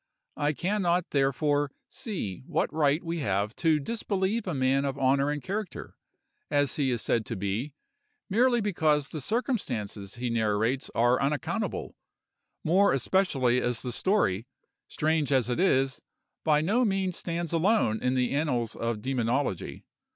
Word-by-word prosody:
I 145 +1 +1
can 200 +7 -1
not, 175 -1 +1
therefore, 145 +1 +1 0.2
see 200 - -5
what - - 0
right 150 +1 +2
we 170 0 -3
have 100 -4 -1
to 160 -2 +3
disbelieve 205 +3 -1
a 175 - -1
man 135 +1 +2
of 135 -1 -2
honor 135 +1 +2
and 145 -1 -3
character, 200 -1 -5 0.5
as 145 -1 +1
he 140 -3 +1
is 120 -3 -1
said 115 - +1
to 115 - -3
be, 105 +9 -3 0.5
merely 240 +3 +3
because 155 -8 +1
the 155 - -6
circumstances 125 - -2
he 120 0 -3
narrates 115 +4 0
are 120 +2 +3
unaccountable, 140 -2 -2 0.7
more 190 +3 +4
especially 135 -4 +2
as 120 -1 -1
the 125 - -3
story, 120 - +1 0.4
strange 155 -2 0
as 130 -3 +2
it 125 - -1
is, 135 -7 +2 0.4
by 150 -1 +3
no 215 +10 +2
means 195 -4 0
stands 170 -1 -3
alone 165 - +2
in 125 +1 +1
the 125 0 +1
annals 130 -6 0
of 115 -2 -3
demonology. 125 -4 -1
145 Hz, 150 wpm, -28 LUFS, 125-175 Hz, 0.7 s, more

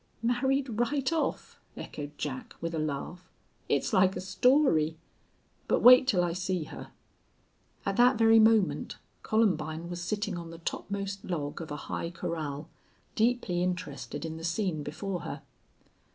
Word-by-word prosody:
"Married 250 0 0
right 275 +4 +1
off!" 325 - -2 0.2
echoed 145 0 -7
Jack, 130 -3 -5
with 165 0 -4
a 160 - -1
laugh. 155 +4 -4 0.4
"It's - - +1
like 190 -1 +4
a - - -3
story. 190 - +3 0.7
But - - +2
wait 255 +1 +9
till 185 -8 +3
I 170 -1 0
see 185 -1 -2
her." - - -9 1.0
At 195 0 -1
that 245 0 +5
very 225 0 +6
moment 220 -3 +3 0.2
Columbine 170 -6 0
was 175 0 -5
sitting 205 0 -2
on 170 -1 -8
the 165 - -9
topmost 200 +3 -4
log 155 -3 -4
of 160 - -7
a 145 - -4
high 170 - -3
corral, 155 -3 -4 0.5
deeply 220 -6 +1
interested 145 -6 -3
in 160 0 -5
the 165 - -9
scene 170 -2 -1
before 180 +6 -4
her. - - -7
180 Hz, 150 wpm, -29 LUFS, 160-225 Hz, 1.0 s, wait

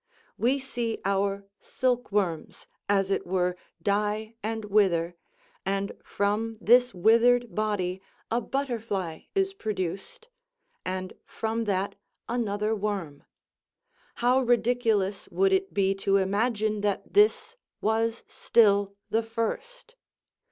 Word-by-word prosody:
We 255 +4 +2
see 240 -4 -3
our 200 0 0
silk 250 -3 -1
worms, 185 -6 -1 0.2
as 195 -1 +2
it - - +1
were, 180 -1 +1 0.3
die 210 +2 0
and 220 0 -3
wither; 185 -5 +2 0.5
and 195 +1 -1
from 215 +3 -1
this 245 +3 +5
withered 235 +5 +4
body 195 -4 -1 0.3
a 235 +2 +1
butterfly 225 - -3
is 390 0 +1
produced; 215 - -4 0.6
and 185 0 -4
from 225 +1 -2
that 195 -1 0 0.3
another 215 -2 -1
worm; 195 -9 -4 0.9
how 250 +2 +3
ridiculous 230 -5 +1
would 390 0 +2
it 385 0 +1
be 195 -1 +2
to 195 0 +1
imagine 210 +2 0
that 205 -1 -2
this 425 +3 +3 0.2
was 225 +1 0
still 200 -3 +3 0.2
the 225 - +3
first! 235 - -4
215 Hz, 110 wpm, -27 LUFS, 195-240 Hz, 0.9 s, this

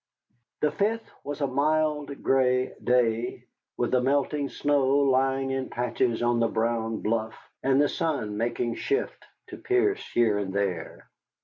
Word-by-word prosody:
The 150 - +2
5th 215 +8 0 0.2
was 145 +1 -5
a - - +3
mild, 150 +1 0
gray 130 -1 +2
day, 120 -1 +1 0.3
with - - 0
the 125 - +3
melting 140 +2 0
snow 145 -2 +1
lying 135 -1 +2
in 135 -1 -2
patches 120 0 -1
on 120 0 +2
the 115 - +3
brown 115 0 -1
bluff, 110 0 -1 0.3
and 135 0 +3
the 145 - +4
sun 145 - -2
making 120 +1 -1
shift 410 +1 -2 0.3
to - - -8
pierce 395 +2 +1
here 110 -4 +3
and 95 -2 -3
there. 95 -5 -3
130 Hz, 145 wpm, -27 LUFS, 115-145 Hz, 0.3 s, the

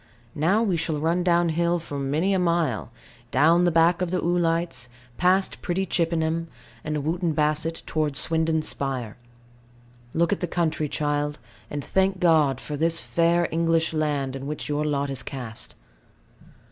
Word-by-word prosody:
Now 185 +9 +2
we 190 -6 +1
shall 160 -1 -1
run 165 +4 +1
down 175 -1 +3
hill 170 +2 +1
for 145 -4 -6
many 150 +8 0
a 190 - +2
mile, 165 - 0 0.4
down 165 +7 +4
the 175 - +3
back 165 +2 +3
of 180 - 0
the 185 - 0
oolites, 170 -6 0 0.3
past 185 +2 +2
pretty 190 +2 -1
Chippenham, 165 -1 0 0.4
and 150 -2 -2
Wootton 170 +2 0
Bassett, 155 +2 0
towards 150 -3 -1
Swindon 160 -1 +1
spire. 130 -7 -2 1.0
Look 170 +4 +2
at - - -3
the 180 - -2
country, 160 -3 -1
child; 145 0 -1 0.3
and 145 -1 -5
thank 190 0 +1
God 155 -7 +3
for 150 - -6
this 165 +2 +1
fair 170 0 +2
English 165 0 +1
land, 145 -4 -1
in 135 +1 -6
which 150 0 -5
your 150 0 -1
lot 140 -2 -1
is 130 -1 -3
cast. 125 -6 -7
160 Hz, 160 wpm, -25 LUFS, 145-170 Hz, 1.0 s, down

